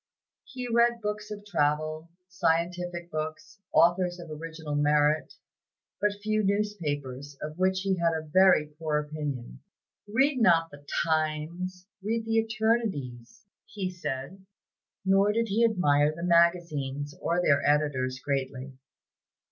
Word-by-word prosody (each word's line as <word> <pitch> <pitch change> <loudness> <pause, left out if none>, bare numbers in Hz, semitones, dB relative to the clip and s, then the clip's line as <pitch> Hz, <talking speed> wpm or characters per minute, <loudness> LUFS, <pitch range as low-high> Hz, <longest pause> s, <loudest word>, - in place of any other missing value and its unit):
He 250 -2 -6
read 235 0 +3
books 210 -1 -4
of 205 -1 -7
travel, 155 -2 0 0.2
scientific 175 0 -1
books, 155 +6 -5
authors 175 +1 +3
of 170 -2 -9
original 160 -1 -6
merit, 150 +1 +2 0.7
but 210 0 +2
few 215 0 +1
newspapers, 145 -10 -2
of 155 +3 -7
which 185 0 +2
he 195 -1 0
had 170 -1 +2
a 160 0 -4
very 185 0 +5
poor 150 0 -3
opinion. 150 - -5 0.5
"Read 260 +5 +2
not 165 -5 +4
the 145 0 -13 0.2
'Times,' 160 +4 -2 0.2
read 225 +3 -2
the 225 0 +1
Eternities," 220 - -2 0.2
he 190 -3 -4
said. 165 +2 -5 0.6
Nor 195 +2 +4
did 230 0 0
he 220 +4 +2
admire 150 -10 +3
the 170 +2 -8
magazines, 170 -5 +1
or 170 +1 +1
their 140 -5 +3
editors, 145 -4 +1
greatly. 135 -1 -3
170 Hz, 125 wpm, -28 LUFS, 150-195 Hz, 0.7 s, very